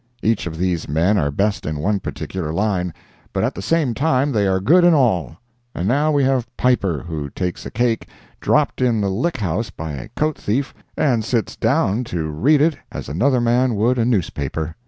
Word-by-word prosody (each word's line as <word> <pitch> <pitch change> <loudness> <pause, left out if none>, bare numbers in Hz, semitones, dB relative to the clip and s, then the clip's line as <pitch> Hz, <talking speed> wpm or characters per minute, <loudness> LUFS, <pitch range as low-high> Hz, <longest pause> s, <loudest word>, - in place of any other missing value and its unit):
Each 110 -4 +1
of 80 -1 -6
these 90 -3 -1
men 85 +8 +2
are 70 - +1
best 100 +8 0
in 75 0 -3
one 100 +7 0
particular 90 -4 -5
line, 90 -1 0 0.4
but - - 0
at - - 0
the 95 - -6
same 150 +1 +1
time 140 +1 +1
they 105 -5 +1
are 95 0 +2
good 165 - +4
in 175 -2 +6
all. 90 - +1 0.4
And 90 - -2
now 145 +6 +2
we 145 -2 +2
have 130 -2 +1
Piper, 100 - +1
who 75 -4 -4
takes 90 +3 -4
a - - -6
cake, 115 0 0 0.3
dropped - - +1
in 120 -3 +2
the 100 -2 0
Lick 130 - -1
House 105 +1 -2
by 80 -1 -6
a 70 -4 -7
coat 155 0 0
thief, 135 +6 -1 0.2
and 120 -6 +2
sits 115 0 -1
down 115 -2 +1
to 80 -6 -3
read 140 - +3
it 155 -1 +2
as - - -6
another 125 - +2
man 120 +1 +2
would 120 +5 +2
a - - +3
newspaper. 80 - -1
105 Hz, 200 wpm, -20 LUFS, 85-130 Hz, 0.4 s, in